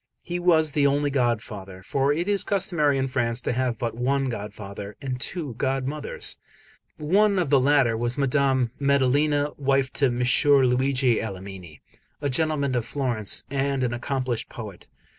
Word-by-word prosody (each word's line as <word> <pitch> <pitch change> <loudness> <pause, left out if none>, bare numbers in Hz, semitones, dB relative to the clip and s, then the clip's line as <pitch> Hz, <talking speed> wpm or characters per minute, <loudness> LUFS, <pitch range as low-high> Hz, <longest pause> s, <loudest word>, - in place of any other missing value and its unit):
He 175 0 -4
was 160 -3 +3
the 145 -1 +3
only 145 +1 +1
godfather; 105 -7 -2
for 135 +7 +1
it 170 +5 -1
is 205 -1 +2
customary 170 -8 +1
in 135 0 0
France 120 -2 0
to - - -2
have 125 -2 -1
but 115 +1 -3
one 135 +3 0
godfather 100 -2 -7
and 130 -3 -4
two 155 -3 -3
godmothers. 135 +2 -2 0.6
One 200 +7 +2
of 170 -6 0
the 140 - +6
latter 135 -3 +3
was 120 +3 -2
Madame 135 -3 +1
Maddalena, 145 +2 +2
wife 135 -2 +1
to 140 - +2
M. 120 -1 -2 0.4
Luigi 130 -1 +2
Alamanni, 95 -6 -8 0.4
a 145 -1 -2
gentleman 145 -1 0
of 120 -2 0
Florence 120 -6 -1
and 140 -1 0
an 120 -1 0
accomplished 125 -1 -3
poet. 105 -6 -9
135 Hz, 155 wpm, -25 LUFS, 120-145 Hz, 0.6 s, the